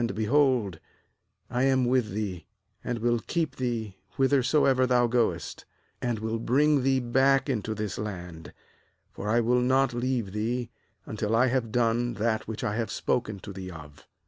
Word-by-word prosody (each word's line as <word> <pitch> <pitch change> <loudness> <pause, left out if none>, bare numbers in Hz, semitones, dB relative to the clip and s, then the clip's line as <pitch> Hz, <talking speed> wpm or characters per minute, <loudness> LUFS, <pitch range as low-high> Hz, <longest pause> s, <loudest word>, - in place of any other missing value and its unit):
J - - +1
behold, 115 - +2 0.7
I 125 0 -2
am 130 -2 +3
with 125 -3 +2
thee, 95 -4 -4 0.4
and 120 -1 -2
will 120 +1 +1
keep 165 +6 -2
thee 115 -6 -3 0.2
whithersoever 135 -1 +3
thou 125 -1 +3
goest, 115 - -1 0.4
and 120 -2 -1
will 110 +1 -3
bring 145 +5 +3
thee 135 0 +2
back 135 +3 +2
into 110 -4 -2
this 105 -2 -4
land; 90 -7 -6 0.6
for 105 - -5
I 115 +2 +3
will 125 +2 +2
not 130 +1 +2
leave 120 -4 -1
thee, 115 +3 -2 0.3
until 110 0 -2
I 125 +3 +4
have 120 -3 -1
done 120 0 +1
that 110 0 -1
which 110 -1 -5
I 105 +1 -1
have 115 -2 -2
spoken 110 -4 -1
to 100 - -8
thee 95 -1 -7
of.' 75 -4 -12
120 Hz, 165 wpm, -27 LUFS, 105-130 Hz, 0.7 s, I